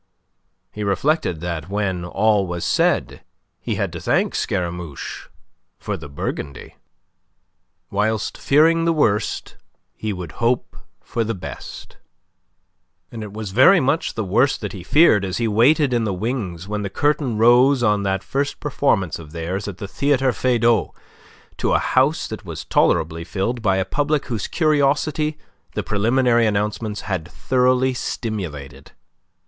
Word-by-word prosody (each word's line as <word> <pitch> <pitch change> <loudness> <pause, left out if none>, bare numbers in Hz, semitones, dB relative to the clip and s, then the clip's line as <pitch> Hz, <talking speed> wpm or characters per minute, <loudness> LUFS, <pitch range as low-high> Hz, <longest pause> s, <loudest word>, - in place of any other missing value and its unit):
He 105 - -5
reflected 100 - 0
that, 85 -1 -4
when 95 -3 -1
all 105 +2 +1
was 85 -1 -4
said, - - +1 0.4
he - - -3
had - - -2
to - - -5
thank - - +1
Scaramouche 85 -4 -4 0.5
for - - -4
the 75 -2 -9
Burgundy. 70 -1 -5 1.2
Whilst 105 +1 0
fearing 165 +3 +3
the 165 - +3
worst, 110 -10 0 0.4
he 110 - -4
would 90 -4 -6
hope 120 +1 0 0.3
for 115 - -2
the 115 0 -3
best. 90 - -9 1.1
And 115 - -7
it 105 -2 -7
was 105 -1 -6
very 130 - +6
much 140 +3 0
the 110 - -1
worst 120 +8 +2
that 105 - -4
he 95 - -7
feared 125 - +5
as 95 -1 -2
he 115 - 0
waited 130 +6 +3
in 120 -1 +1
the 100 -4 -1
wings 95 -5 -3
when 105 0 -3
the 100 - -3
curtain 145 -2 0
rose 120 +3 +5
on 105 -3 +3
that 95 -1 -1
first 140 +1 -2
performance 110 - 0
of 75 -2 -12
theirs 90 +5 -4
at 100 -3 -6
the 100 - -6
Theatre 135 +2 +1
Feydau 120 -4 +1 0.6
to - - 0
a - - +5
house 135 +5 +1
that 110 - -7
was 85 -5 -7
tolerably 80 +1 +1
filled 105 +7 -2
by 95 -3 +2
a 95 - 0
public 145 +6 0
whose 115 -6 -3
curiosity 150 0 +1 0.4
the - - -2
preliminary 120 +2 +2
announcements 105 +1 -2
had 95 -6 -3
thoroughly 130 +4 +1
stimulated. 75 - -5
110 Hz, 150 wpm, -21 LUFS, 95-130 Hz, 1.2 s, very